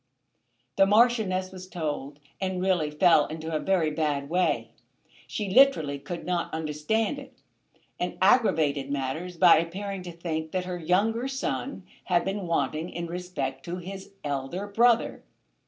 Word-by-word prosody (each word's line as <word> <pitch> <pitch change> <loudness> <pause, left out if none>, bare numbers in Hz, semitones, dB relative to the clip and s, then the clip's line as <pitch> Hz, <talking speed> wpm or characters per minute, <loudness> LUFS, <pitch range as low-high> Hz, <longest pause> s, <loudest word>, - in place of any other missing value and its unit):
The 195 - +6
Marchioness 210 -4 +3
was 185 -1 -9
told 150 -4 -4 0.2
and 190 -1 -1
really 180 -5 +1
fell 150 0 +4
into 160 +1 -5
a - - +1
very 175 -4 +1
bad 150 -2 -1
way. 180 +1 +1 0.6
She 210 - -3
literally 210 - +4
could 170 +4 -6
not 175 -1 -1
understand 160 - -1
it, 270 -1 -13 0.6
and 180 - -3
aggravated 160 - +3
matters 145 +6 -3
by 170 -1 +7
appearing 190 +4 -3
to 180 -1 -7
think 160 -2 -4
that 185 -1 -1
her 180 -1 -4
younger 210 +9 +1
son 270 -4 -3 0.2
had 175 -2 +2
been 195 -1 -3
wanting 160 +1 -1
in 170 0 -5
respect 165 -7 -4
to 175 - -4
his 190 +2 -8
elder 145 +7 -3
brother. 230 +3 +2
180 Hz, 145 wpm, -27 LUFS, 155-195 Hz, 0.6 s, by